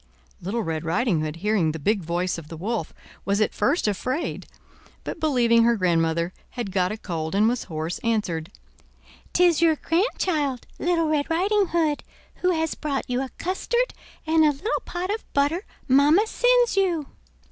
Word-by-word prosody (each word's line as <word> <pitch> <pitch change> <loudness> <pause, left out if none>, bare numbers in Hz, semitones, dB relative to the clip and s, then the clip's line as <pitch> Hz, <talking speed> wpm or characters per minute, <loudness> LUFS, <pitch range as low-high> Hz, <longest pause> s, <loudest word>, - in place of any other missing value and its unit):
Little 215 +6 -2
Red 160 -3 -3
Riding 170 +1 +1
Hood, 155 0 -3
hearing 180 -3 +1
the - - -4
big 200 +7 +1
voice 175 +1 -1
of 155 - -12
the 165 - -8
Wolf, 215 +6 -3 0.3
was 200 +1 0
at 215 - +1
first 290 -2 +1
afraid; 255 - -2 0.6
but - - -5
believing 240 -6 +3
her 235 0 +4
grandmother 170 -2 +1 0.2
had 235 -6 -5
got 185 0 +1
a 215 - -4
cold 165 -4 -4
and 210 +2 +4
was 240 +1 -1
hoarse, 160 0 -4
answered: 185 -8 -1 0.8
'Tis 350 -3 +4
your 325 -2 +5
grandchild, 320 - 0
Little 335 -2 +1
Red 300 -1 0
Riding 390 +4 +2
Hood, 320 -4 0 0.3
who 365 - +1
has 320 -2 0
brought 285 -3 -3
you 250 +1 -1
a 265 - -4
custard 475 +7 -1 0.3
and 320 0 +4
a 305 - +6
little 295 - -3
pot 360 +2 -3
of 440 - -5
butter 290 +7 +1 0.2
mamma 290 +10 +5
sends - - +3
you." 355 -6 +1
250 Hz, 170 wpm, -24 LUFS, -, 0.8 s, a